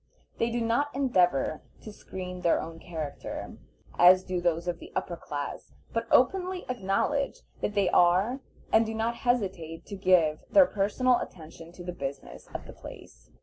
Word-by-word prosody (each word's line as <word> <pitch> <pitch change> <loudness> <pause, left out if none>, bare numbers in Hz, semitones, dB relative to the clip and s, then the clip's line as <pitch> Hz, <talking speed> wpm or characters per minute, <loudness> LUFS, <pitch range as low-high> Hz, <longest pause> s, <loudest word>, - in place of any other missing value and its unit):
They 230 - +2
do 235 0 -1
not 240 +6 0
endeavor 180 - +2 0.2
to 215 - -9
screen 180 -2 -7
their 170 - +3
own 165 0 -7
character, 160 -5 -6 0.4
as 185 +1 +8
do 185 -1 -2
those 170 0 0
of 175 -1 -2
the - - -11
upper 175 - -2
class, 145 -3 -6 0.2
but 230 0 -1
openly 365 +6 +2
acknowledge 255 +5 -1 0.2
what 210 - -2
they 200 -2 +3
are, 185 +9 +3 0.3
and 220 - +6
do 225 0 -4
not 230 +1 -1
hesitate 190 -9 -1
to 200 - -7
give 180 -5 +3
their 290 -2 +7
personal 240 +3 +2
attention 165 -1 -9
to 175 - -10
the 180 0 -5
business 140 -4 -7
of - - -7
the - - -10
place. - - -13
185 Hz, 165 wpm, -28 LUFS, 170-230 Hz, 0.4 s, as